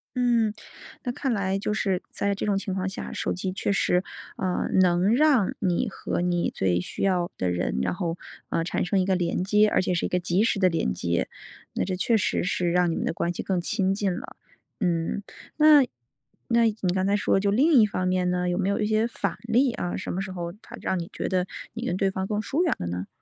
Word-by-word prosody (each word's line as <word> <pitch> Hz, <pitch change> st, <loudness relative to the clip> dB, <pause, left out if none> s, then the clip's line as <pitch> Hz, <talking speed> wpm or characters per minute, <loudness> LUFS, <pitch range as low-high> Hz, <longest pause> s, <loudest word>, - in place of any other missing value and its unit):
嗯， 235 Hz, -4 st, +2 dB, 0.5 s
那 245 Hz, -, -1 dB
看 260 Hz, -1 st, -1 dB
来 195 Hz, -2 st, 0 dB
就 210 Hz, +1 st, -2 dB
是， 195 Hz, -4 st, 0 dB
在 200 Hz, 0 st, -1 dB
这 195 Hz, -, -3 dB
种 205 Hz, -2 st, +1 dB
情 195 Hz, 0 st, -3 dB
况 190 Hz, 0 st, -1 dB
下， 195 Hz, -, -5 dB
手 -, -, -1 dB
机 185 Hz, +1 st, -3 dB
确 195 Hz, +2 st, -1 dB
实， 180 Hz, -2 st, +2 dB, 0.3 s
呃， 185 Hz, -1 st, -1 dB
能 185 Hz, +4 st, +4 dB
让 280 Hz, -9 st, +4 dB
你 180 Hz, -3 st, 0 dB
和 -, -, -3 dB
你 175 Hz, -1 st, 0 dB
最 90 Hz, -2 st, +1 dB
需 90 Hz, -, -6 dB
要 180 Hz, -3 st, +1 dB
的 90 Hz, -, -1 dB
人， 90 Hz, -6 st, -1 dB
然 -, -, 0 dB
后， 170 Hz, -3 st, -2 dB, 0.3 s
呃， 165 Hz, -, 0 dB
产 175 Hz, -, -1 dB
生 190 Hz, +2 st, +1 dB
一 185 Hz, -, +2 dB
个 190 Hz, -1 st, +2 dB
连 175 Hz, 0 st, 0 dB
接， 210 Hz, +2 st, +4 dB
而 -, -, +2 dB
且 185 Hz, -, -1 dB
是 -, -, 0 dB
一 -, -, -2 dB
个 180 Hz, -, +1 dB
即 180 Hz, +3 st, +1 dB
时 220 Hz, -3 st, +1 dB
的 185 Hz, -, +4 dB
连 165 Hz, -, 0 dB
接。 85 Hz, 0 st, -1 dB, 0.5 s
那 -, -, -1 dB
这 185 Hz, 0 st, -2 dB
确 225 Hz, +5 st, +2 dB
实 205 Hz, -, +1 dB
是 180 Hz, -2 st, 0 dB
让 180 Hz, -1 st, +3 dB
你 -, -, -2 dB
们 -, -, -2 dB
的 -, -, 0 dB
关 170 Hz, +1 st, -1 dB
系 -, -, -4 dB
更 185 Hz, -2 st, -1 dB
亲 190 Hz, +2 st, 0 dB
近 195 Hz, -3 st, 0 dB
了。 -, -, -8 dB, 0.4 s
嗯， 175 Hz, 0 st, 0 dB, 0.3 s
那 305 Hz, -1 st, +8 dB, 0.7 s
那 235 Hz, 0 st, +4 dB
你 205 Hz, -5 st, 0 dB
刚 190 Hz, 0 st, 0 dB
才 200 Hz, -, +3 dB
说 205 Hz, -1 st, +2 dB
就 200 Hz, 0 st, +1 dB
另 280 Hz, +10 st, +3 dB
一 -, -, +6 dB
方 185 Hz, -2 st, -2 dB
面 185 Hz, 0 st, +1 dB
呢， 180 Hz, 0 st, 0 dB
有 175 Hz, 0 st, 0 dB
没 195 Hz, -, +1 dB
有 200 Hz, -, 0 dB
一 210 Hz, -, +1 dB
些 215 Hz, +1 st, +2 dB
反 235 Hz, -, -3 dB
例 240 Hz, +3 st, +2 dB
啊， 175 Hz, -, -3 dB
什 -, -, -4 dB
么 190 Hz, -, -2 dB
时 190 Hz, -1 st, -5 dB
候 170 Hz, -2 st, -5 dB
它 -, -, -11 dB
让 185 Hz, -, -1 dB
你 170 Hz, -, -6 dB
觉 -, -, -3 dB
得 185 Hz, -1 st, 0 dB, 0.3 s
你 235 Hz, +1 st, -5 dB
跟 180 Hz, -, -1 dB
对 195 Hz, 0 st, +1 dB
方 190 Hz, 0 st, -3 dB
更 210 Hz, -1 st, -1 dB
疏 275 Hz, +10 st, -1 dB
远 340 Hz, -, +1 dB
了 -, -, -5 dB
呢？ 90 Hz, +2 st, -4 dB
190 Hz, 260 characters per minute, -26 LUFS, 180-210 Hz, 0.7 s, 那